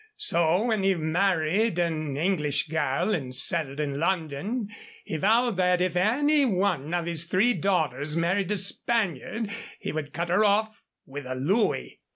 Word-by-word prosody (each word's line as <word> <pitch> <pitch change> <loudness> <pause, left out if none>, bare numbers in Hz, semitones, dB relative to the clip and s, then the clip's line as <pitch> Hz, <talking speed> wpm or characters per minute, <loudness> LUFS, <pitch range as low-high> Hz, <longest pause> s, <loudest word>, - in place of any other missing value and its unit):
So 170 +4 +2
when 220 -4 0
he 195 0 +2
married 175 +4 +1
an 155 -5 -1
English 155 -3 0
girl 155 +5 0
and 130 -6 -2
settled 140 0 +1
in 140 -2 -2
London, 185 - -2 0.4
he 160 - -3
vowed 225 +4 +2
that 180 -1 +2
if 180 -1 0
any 285 +11 +3
one 185 - 0
of 175 -1 -1
his 170 -1 -1
three 195 +8 +2
daughters 155 - -1
married 175 +3 0
a 210 - 0
Spaniard 205 - -1 0.3
he - - -4
would 150 -2 -5
cut 170 +3 -3
her 190 +5 +3
off 215 +1 +2 0.3
with 140 0 -8
a 130 - -4
louis." 190 - 0
175 Hz, 160 wpm, -26 LUFS, 155-205 Hz, 0.4 s, any